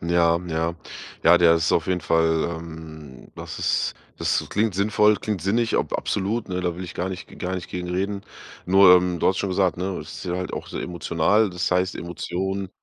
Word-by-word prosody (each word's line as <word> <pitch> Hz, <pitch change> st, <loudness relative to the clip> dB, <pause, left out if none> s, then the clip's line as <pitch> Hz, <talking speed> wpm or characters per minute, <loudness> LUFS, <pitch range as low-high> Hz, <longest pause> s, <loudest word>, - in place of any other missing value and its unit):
Ja, 85 Hz, 0 st, +3 dB
ja. 80 Hz, 0 st, -1 dB, 0.5 s
Ja, 85 Hz, +1 st, +7 dB
der 85 Hz, -1 st, +6 dB
ist 80 Hz, +1 st, +1 dB
auf 80 Hz, -, +2 dB
jeden 90 Hz, -1 st, 0 dB
Fall, 80 Hz, 0 st, +2 dB
ähm, 80 Hz, -4 st, -10 dB
das -, -, -8 dB
ist, -, -, 0 dB, 0.2 s
das -, -, 0 dB
klingt 105 Hz, -2 st, 0 dB
sinnvoll, 105 Hz, +1 st, +3 dB
klingt 105 Hz, -6 st, -3 dB
sinnig, 115 Hz, +4 st, +1 dB
ab -, -, -1 dB
absolut, 105 Hz, +3 st, -1 dB
ne? 90 Hz, 0 st, -2 dB
Da 90 Hz, -2 st, -2 dB
will 90 Hz, -, -5 dB
ich 90 Hz, -, -9 dB
gar 90 Hz, -, -2 dB
nicht 95 Hz, -1 st, -6 dB
g -, -, -15 dB
gar 95 Hz, +1 st, -3 dB
nicht 90 Hz, -2 st, -5 dB
gegen 90 Hz, 0 st, -5 dB
reden. 100 Hz, +2 st, -2 dB, 0.4 s
Nur, 95 Hz, 0 st, +7 dB
ähm, 90 Hz, -1 st, +2 dB
du -, -, +1 dB
hattest 95 Hz, -, +2 dB
schon 100 Hz, -, -2 dB
gesagt, 95 Hz, -1 st, +1 dB
ne, 95 Hz, +1 st, -3 dB
es 75 Hz, -, -10 dB
ist 80 Hz, -, -8 dB
sehr 90 Hz, -1 st, -2 dB
halt 90 Hz, -, -4 dB
auch -, -, -5 dB
sehr -, -, -5 dB
emotional. 90 Hz, +5 st, +1 dB
Das 90 Hz, +1 st, -2 dB
heißt 90 Hz, +1 st, +1 dB
Emotionen, 95 Hz, +3 st, -4 dB
90 Hz, 215 wpm, -23 LUFS, 85-95 Hz, 0.5 s, Ja